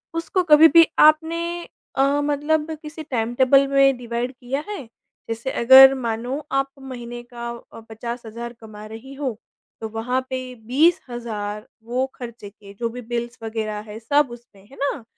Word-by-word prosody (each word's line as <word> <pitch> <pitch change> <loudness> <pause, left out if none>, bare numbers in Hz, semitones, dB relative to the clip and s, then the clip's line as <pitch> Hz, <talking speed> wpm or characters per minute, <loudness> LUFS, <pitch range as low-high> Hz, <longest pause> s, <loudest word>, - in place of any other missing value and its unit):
उसको 335 +3 0
कभी 315 -1 +8
भी 330 - +10
आपने 320 +2 +5 0.6
अ, 280 +2 +2
मतलब 295 +2 0
किसी 310 0 -8
टाइमटेबल 260 +1 +3
में 275 -1 +4
डिवाइड 240 +1 -3
किया 265 +3 -4
है? 415 -3 -4 0.5
जैसे 230 +4 -3
अगर 265 +3 +8
मानो 240 +1 -3
आप 275 0 +1
महीने 240 -2 -7
का 235 0 -5
अ, 235 -1 -10
50 235 +2 -6
हज़ार 235 +2 -7
कमा 215 -1 -11
रही 225 +5 -10
हो 270 -5 -4 0.4
तो 220 - -3
वहाँ 225 +4 -1
पे 255 -1 -4
20 310 +8 +4
हज़ार 215 -2 -5 0.2
वो 245 +3 -1
ख़र्चे 235 -4 -9
के 200 -1 -15
जो 235 -1 -1
भी 250 +2 -8
बिल्स 240 +1 -4
वगैरह 220 -1 -3
हैं 210 - -7
सब 285 +5 +2
उसमें, 235 -5 -14
है 270 - -16
ना? 280 -2 -2
245 Hz, 160 wpm, -22 LUFS, 230-275 Hz, 0.6 s, भी